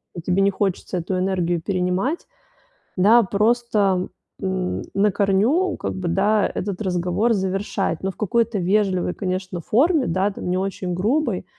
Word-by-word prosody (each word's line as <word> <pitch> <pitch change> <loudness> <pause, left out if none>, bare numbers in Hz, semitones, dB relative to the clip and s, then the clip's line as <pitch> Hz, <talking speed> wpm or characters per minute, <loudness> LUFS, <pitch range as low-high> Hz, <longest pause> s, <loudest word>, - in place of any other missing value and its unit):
и 170 - -5
тебе 180 +3 +1
не 200 0 +3
хочется 190 -1 -2
эту 185 +2 -2
энергию 180 -3 0
перенимать, 185 - -1 0.7
да, 220 +6 +6
просто, 205 -2 +1 0.3
м, 190 -2 -2
на 205 +1 +3
корню, 220 - +2
как - - -4
бы, 185 -2 -4
да, 205 +3 +2
этот 190 -1 -3
разговор 180 +5 +1
завершать, 190 -3 -2
но 195 - -1
в 180 - -22
какой-то 225 +1 0
вежливой, 185 -1 +1
конечно, 185 -2 -3
форме, 280 - +2
да, 190 +4 +1
там, - - -7
не 180 - +1
очень 190 -1 -3
грубой, 215 - 0
195 Hz, 150 wpm, -22 LUFS, 180-215 Hz, 0.7 s, да